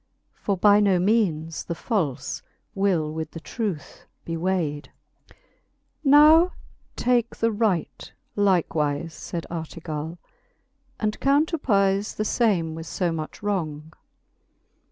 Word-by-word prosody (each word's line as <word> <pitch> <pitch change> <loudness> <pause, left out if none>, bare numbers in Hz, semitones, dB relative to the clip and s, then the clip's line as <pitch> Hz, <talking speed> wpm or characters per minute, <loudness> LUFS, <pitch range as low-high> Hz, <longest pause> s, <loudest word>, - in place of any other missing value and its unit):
For 200 -2 -2
by 205 +2 +6
no 200 -3 +4
meanes 175 -5 0
the 170 - -4
falle 170 - -1 0.6
will 175 -6 +1
with 160 -1 -4
the 165 - -6
truth 195 -3 -5 0.2
be 165 - -3
wayd. 165 -4 -1 0.4
XLVI. - - -19 0.7
Now 305 +5 +7 0.4
take 240 -1 +1
the 230 0 +1
right 205 -6 -1 0.2
likewife, 165 -6 +1
fayd 170 +1 -6
Ar 165 -2 -3
legale, 160 0 -6 0.8
And 215 -1 -1
counterpeiie 230 - +2
the 215 - -2
fame 195 -10 +1
with 160 0 -7
fb 175 0 -1
much 155 +4 -6
wrong. 160 -6 -3
185 Hz, 115 wpm, -24 LUFS, 160-215 Hz, 0.8 s, Now